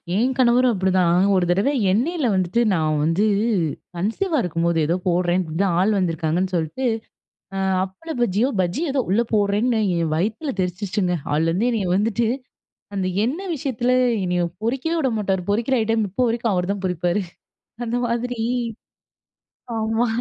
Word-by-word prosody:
என் 250 Hz, +5 st, +2 dB
கணவரும் 250 Hz, -1 st, +4 dB
அப்படி 190 Hz, -1 st, 0 dB
தான். 180 Hz, +2 st, +3 dB
ஒரு 185 Hz, -2 st, +2 dB
தடவ 195 Hz, +9 st, +2 dB, 0.2 s
எண்ணெய்ல 275 Hz, -, +1 dB
வந்துட்டு 185 Hz, +5 st, +1 dB
நான் 155 Hz, -3 st, +1 dB
வந்து 165 Hz, +7 st, +2 dB, 0.7 s
கன்சீவா 295 Hz, -, -1 dB
இருக்கும்போது, 170 Hz, 0 st, 0 dB
ஏதோ 170 Hz, -, +2 dB
போட்றேன் 175 Hz, +1 st, +2 dB
இப்படி 160 Hz, -2 st, -5 dB
தான் 185 Hz, -4 st, +1 dB
ஆள் 210 Hz, +2 st, +2 dB
வந்திருக்காங்கன்னு 175 Hz, +1 st, 0 dB
சொல்ட்டு, 165 Hz, +11 st, -2 dB, 0.7 s
அ -, -, -2 dB, 0.3 s
அப்பள 195 Hz, -, -10 dB
பஜ்ஜியோ, 235 Hz, +3 st, +2 dB
பஜ்ஜி 185 Hz, -, -1 dB
ஏதோ 265 Hz, -2 st, +1 dB
உள்ள 230 Hz, +5 st, +3 dB
போட்றேன்னு 210 Hz, +3 st, +2 dB, 0.2 s
என் 160 Hz, -2 st, -1 dB
வயித்துல 220 Hz, -, -1 dB
தெறிச்சுருச்சுங்க. 180 Hz, 0 st, -1 dB, 0.2 s
அதுலேருந்து 165 Hz, +9 st, +1 dB
என்னைய 210 Hz, -6 st, -1 dB
வந்துட்டு, 225 Hz, +2 st, +1 dB, 0.7 s
அந்த 185 Hz, -1 st, 0 dB, 0.2 s
எண்ணெய் 340 Hz, +8 st, -2 dB
விஷயத்துல 250 Hz, -2 st, -1 dB, 0.3 s
என்னைய 180 Hz, 0 st, 0 dB, 0.2 s
பொரிக்கவே 270 Hz, +8 st, -1 dB
விடமாட்டாரு. 210 Hz, -, 0 dB
பொறிக்கிற 235 Hz, +5 st, +1 dB
ஐட்டம் 220 Hz, -1 st, +1 dB
இப்போ 250 Hz, +7 st, 0 dB
வரைக்கும் 230 Hz, -2 st, 0 dB
அவர்தான் 190 Hz, +2 st, -1 dB
பொறிப்பாரு. 180 Hz, +2 st, 0 dB, 0.6 s
அந்த 235 Hz, +1 st, -2 dB
மாதிரி. 240 Hz, 0 st, -2 dB, 1.4 s
ஆமா. 225 Hz, +2 st, +1 dB
205 Hz, 140 wpm, -22 LUFS, 180-240 Hz, 1.4 s, கணவரும்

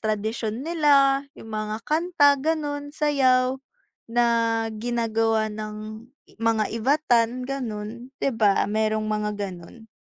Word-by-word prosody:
tradisyon 220 Hz, +3 st, -2 dB
nila, 285 Hz, -4 st, +4 dB
yung 225 Hz, 0 st, -11 dB
mga 215 Hz, 0 st, -3 dB
kanta, 305 Hz, -4 st, +3 dB
gano'n, 290 Hz, -2 st, -2 dB
sayaw 265 Hz, -3 st, +2 dB, 0.5 s
na 240 Hz, +1 st, +2 dB, 0.5 s
ginagawa 225 Hz, -2 st, 0 dB
ng 215 Hz, +2 st, -7 dB, 0.3 s
mga 225 Hz, -1 st, +2 dB
Ivatan, 245 Hz, -1 st, +1 dB
gano'n. 240 Hz, -2 st, -5 dB
Di 275 Hz, -, -1 dB
ba 210 Hz, -3 st, +3 dB
merong 215 Hz, +1 st, 0 dB
mga 210 Hz, 0 st, -1 dB
ganun. 200 Hz, +3 st, -8 dB
230 Hz, 110 wpm, -24 LUFS, 215-275 Hz, 0.5 s, nila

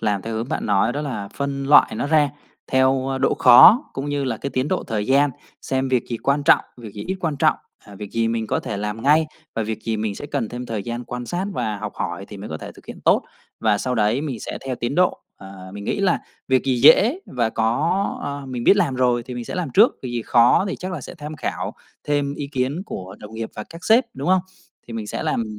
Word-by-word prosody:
làm 105 Hz, -3 st, 0 dB
theo 115 Hz, +2 st, -4 dB
hướng 115 Hz, +3 st, -3 dB
bạn -, -, -2 dB
nói 105 Hz, +3 st, +2 dB
đó 145 Hz, -, -3 dB
là 125 Hz, -9 st, -4 dB
phân 140 Hz, -1 st, -3 dB
loại 145 Hz, +1 st, +6 dB
nó 140 Hz, -, -1 dB
ra 150 Hz, -1 st, +3 dB, 0.4 s
theo, 130 Hz, 0 st, +2 dB
ơ, 135 Hz, 0 st, -2 dB
độ -, -, +2 dB
khó 130 Hz, -, +8 dB
cũng 135 Hz, +2 st, -4 dB
như 145 Hz, -1 st, -1 dB
là 120 Hz, -4 st, -2 dB
cái 140 Hz, -, -5 dB
tiến 130 Hz, +2 st, -1 dB
độ 185 Hz, -, -1 dB
thời 105 Hz, -2 st, -2 dB
gian, 140 Hz, +2 st, +4 dB, 0.3 s
xem 130 Hz, 0 st, -1 dB
việc 125 Hz, -2 st, +1 dB
gì 120 Hz, -, -2 dB
quan 140 Hz, +5 st, 0 dB
trọng, -, -, +5 dB
việc 115 Hz, -4 st, -10 dB
gì 105 Hz, -, -6 dB
ít 190 Hz, +1 st, -3 dB
quan 160 Hz, -5 st, -1 dB
trọng, -, -, +3 dB, 0.3 s
à, 100 Hz, -, -13 dB
việc 100 Hz, 0 st, -8 dB
gì 115 Hz, 0 st, +1 dB
mình 115 Hz, -1 st, -1 dB
có -, -, -1 dB
thể 105 Hz, -, -4 dB
làm 105 Hz, +2 st, -4 dB
ngay 155 Hz, +3 st, +4 dB, 0.3 s
và 115 Hz, -, -1 dB
việc 110 Hz, 0 st, -4 dB
gì 110 Hz, -1 st, -1 dB
mình 105 Hz, -1 st, -2 dB
sẽ 145 Hz, -, -7 dB
cần 140 Hz, -6 st, -2 dB
thêm 125 Hz, +2 st, -6 dB
thời 110 Hz, -3 st, -3 dB
gian 120 Hz, +3 st, -5 dB
quan 125 Hz, +1 st, -6 dB
sát 175 Hz, +6 st, -2 dB
và 110 Hz, -, -2 dB
học 105 Hz, 0 st, -5 dB
hỏi 100 Hz, -, -4 dB
thì 105 Hz, -, -9 dB
mới 100 Hz, -, -8 dB
có 80 Hz, -, -4 dB
thể -, -, -8 dB
thực -, -, -18 dB
hiện -, -, -9 dB
tốt -, -, +4 dB, 0.4 s
và 105 Hz, -2 st, +2 dB
sau 125 Hz, +4 st, -2 dB
đấy 110 Hz, +3 st, +2 dB
mình 135 Hz, -7 st, -4 dB
sẽ -, -, -5 dB
theo 130 Hz, -, -1 dB
tiến 120 Hz, +4 st, -3 dB
độ, 180 Hz, +2 st, +2 dB, 0.2 s
ờ, 95 Hz, -1 st, -11 dB
mình 100 Hz, 0 st, -7 dB
nghĩ 200 Hz, -, -1 dB
là 190 Hz, -3 st, +2 dB, 0.3 s
việc 130 Hz, -1 st, +2 dB
gì 130 Hz, -2 st, +1 dB
dễ 220 Hz, -, +6 dB
và 120 Hz, -3 st, -1 dB
có 145 Hz, -, +1 dB, 0.2 s
ờ, 140 Hz, -1 st, -5 dB
mình 125 Hz, -2 st, -5 dB
biết 200 Hz, -, +6 dB
làm 165 Hz, -10 st, +1 dB
rồi 125 Hz, -2 st, +2 dB
thì 125 Hz, +1 st, -8 dB
mình 120 Hz, -1 st, -5 dB
sẽ -, -, -6 dB
làm 180 Hz, -4 st, -2 dB
trước, 220 Hz, +4 st, +6 dB
việc 130 Hz, -, -4 dB
gì 120 Hz, -1 st, -2 dB
khó 120 Hz, +10 st, +4 dB
thì -, -, -3 dB
chắc 185 Hz, +1 st, -5 dB
là 175 Hz, -, -4 dB
sẽ 130 Hz, -, -9 dB
tham 155 Hz, -2 st, -8 dB
khảo -, -, -4 dB, 0.3 s
thêm 145 Hz, -1 st, 0 dB
ý 145 Hz, -, -5 dB
kiến 135 Hz, +6 st, -1 dB
của 95 Hz, -, -7 dB
đồng 105 Hz, +1 st, -11 dB
nghiệp 110 Hz, 0 st, -4 dB
và 105 Hz, -, -5 dB
các 165 Hz, +2 st, -11 dB
sếp, 230 Hz, +4 st, +5 dB
đúng -, -, -4 dB
không? 185 Hz, 0 st, +4 dB, 0.5 s
Thì 120 Hz, -, -9 dB
mình 110 Hz, -2 st, -4 dB
sẽ -, -, -4 dB
làm 110 Hz, -2 st, -2 dB
125 Hz, 265 wpm, -22 LUFS, 110-145 Hz, 0.5 s, khó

